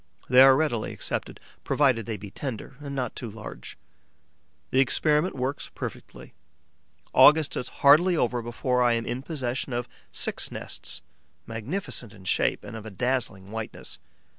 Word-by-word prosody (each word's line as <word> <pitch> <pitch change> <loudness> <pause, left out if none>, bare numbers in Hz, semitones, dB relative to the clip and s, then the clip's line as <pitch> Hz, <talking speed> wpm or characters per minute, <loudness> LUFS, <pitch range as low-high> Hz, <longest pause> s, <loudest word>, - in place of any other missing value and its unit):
They 125 +1 +7
are 135 0 +9
readily 130 -7 0
accepted, - - -4 0.2
provided 130 -7 +2
they 110 -2 -3
be 100 -1 -9
tender 130 +1 -6
and 140 -1 -6
not 125 -4 -2
too 120 - -5
large. 110 +1 -9 0.9
The 130 - +3
experiment 150 +5 +3
works 130 +2 -3
perfectly. - - -8 0.8
August 150 +3 +6
is - - -3
hardly 165 +5 +5
over 120 -3 +1
before 125 +2 -1
I 120 -1 +4
am 115 0 -1
in 125 +2 -3
possession 130 -4 -3
of 120 0 -2 0.2
six - - 0
nests, - - -5 0.4
magnificent 115 - -4
in 95 -3 -15
shape 95 - +1
and - - -8
of 110 -1 -7
a - - -5
dazzling 110 -4 -2
whiteness. 110 -1 -6
125 Hz, 150 wpm, -26 LUFS, 115-140 Hz, 0.9 s, are